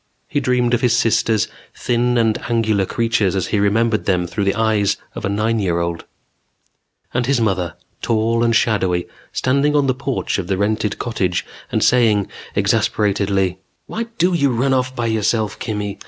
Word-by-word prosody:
He 145 - 0
dreamed 125 -2 +1
of 120 - +2
his 120 -2 +3
sisters, 115 -2 +2 0.3
thin 120 0 0
and 115 -2 +2
angular 110 -4 +1
creatures 115 -5 0
as 95 -2 0
he 105 - +1
remembered 110 +2 +1
them 90 -2 +1
through 85 +4 -2
the 100 - +1
eyes 110 -3 +1 0.2
of - - -5
a - - 0
nine 110 +3 0
year 90 -4 0
old 85 -1 -3 1.1
And 125 0 0
his 140 -2 +2
mother, 95 -6 0 0.3
tall 115 +1 +1
and 115 -1 +2
shadowy, 95 -7 +1 0.2
standing 140 +3 +1
on 145 -1 +3
the 130 - +2
porch 130 -4 -2
of 90 - -4
the 95 - 0
rented 105 0 0
cottage 95 -7 -1 0.3
and - - +1
saying 110 -5 +3 0.3
exasperatedly: 100 -3 +1 0.3
"_Why 230 +1 -4
do 180 +2 +2
you 140 -5 +2
run 130 +2 +1
off 130 0 0
by 120 - -2
yourself, 110 -1 0
Kimmy? 105 -3 -4
110 Hz, 170 wpm, -19 LUFS, 100-120 Hz, 1.1 s, his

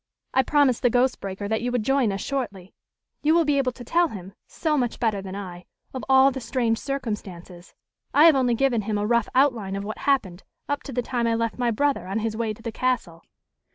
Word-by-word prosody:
I 265 - +5
promised 275 -2 +2
the 245 - +4
Ghost 250 +2 +1
Breaker 195 +1 -5
that 220 +1 -1
you 245 +1 -2
would 245 -3 0
join 270 -2 +2
us 195 0 -4
shortly. 205 -10 -4 0.5
You 310 +2 +3
will 335 -1 +4
be 290 -1 +2
able 255 -2 +1
to 245 - -10
tell 340 +8 +2
him, 195 - -9
so 315 -2 -1
much 245 -5 -1
better 215 -4 0
than 190 0 -7
I, 180 -3 -8 0.3
of 260 - -5
all 265 +1 +6
the 265 0 -6
strange 235 -2 0
circumstances. 200 -9 -6 0.4
I 300 - +6
have 325 -3 +7
only 250 -3 +2
given 245 -2 +1
him 210 0 -2
a 205 - -1
rough 235 0 +1
outline 240 -8 +2
of 200 - -4
what 215 +2 -6
happened 200 -11 0 0.3
up 285 0 -2
to - - -6
the 245 -1 -1
time 240 -1 -1
I 230 - +1
left 230 +1 -2
my 245 -1 +1
brother 280 0 0
on 195 +3 -2
his 220 0 -2
way 225 -1 -1
to 215 +1 -10
the 230 - -4
castle." 220 -9 -2
235 Hz, 230 wpm, -24 LUFS, 205-265 Hz, 0.5 s, have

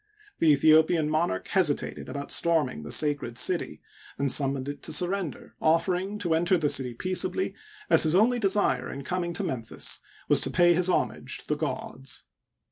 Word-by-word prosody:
The 160 - +5
Aethiopian 155 +2 +4
monarch 155 - -1
hesitated 175 -7 -1
about 140 +2 -6
storming 155 - 0
the 75 - -8
sacred 145 -6 +1
city, 170 +8 -1 0.3
and 140 -1 0
summoned 135 -1 +1
it 145 0 -6
to - - -7
surrender, 180 -2 -1
offering 180 +5 +1
to 180 -5 -1
enter 175 +3 +2
the 155 -3 0
city 125 -4 +1
peaceably, 185 - -1 0.3
as - - +6
his 160 +1 +2
only 240 +5 +3
desire 200 -1 +1
in 140 - -7
coming 175 +3 -2
to - - -4
Memphis 115 -4 -3 0.3
was - - +4
to - - -1
pay 175 0 +4
his 180 +2 +2
homage - - -1
to - - -14
the - - 0
gods. 135 +1 -5
160 Hz, 170 wpm, -27 LUFS, 140-180 Hz, 0.3 s, as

